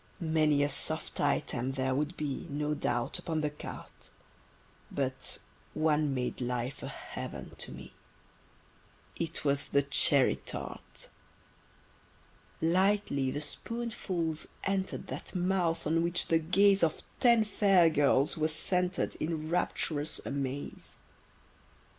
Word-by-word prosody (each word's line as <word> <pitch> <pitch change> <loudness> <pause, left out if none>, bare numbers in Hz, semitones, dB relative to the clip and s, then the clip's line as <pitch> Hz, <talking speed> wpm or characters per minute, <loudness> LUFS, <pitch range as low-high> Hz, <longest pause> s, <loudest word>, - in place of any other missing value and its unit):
Many 155 -3 +2
a - - +3
soft 155 +3 0
item 135 -2 0
there 130 -1 0
would 150 +6 -1
be, 145 -3 -3
No 150 +1 -1
doubt, 120 -5 -1
upon 160 -2 -2
the 150 -1 -1
carte: 150 - -10 0.8
But 130 -1 -1 0.4
one 155 -2 +2
made 125 0 -2
life 125 +1 -2
a - - -5
heaven - - -7
to - - -6
me: - - -10 1.2
It 165 -2 -3
was 140 0 +3
the 140 - +2
cherry 140 - +5
tart. 65 - -7 1.6
Lightly 180 -5 +2
the 145 +3 -3
spoonfuls 180 -3 -3 0.2
enter'd 195 -1 -1
That - - -7
mouth 180 -2 +1
on 165 +2 +2
which 170 +1 0
the 165 - +4
gaze 195 +4 +4
Of 160 -2 +1 0.2
ten 235 -3 +5
fair 195 -4 +4
girls 145 -2 +3
was 155 0 +1
centred 180 +2 0
In 155 0 -3
rapturous 160 -3 -1
amaze. 140 0 -4
155 Hz, 120 wpm, -31 LUFS, 140-175 Hz, 1.6 s, cherry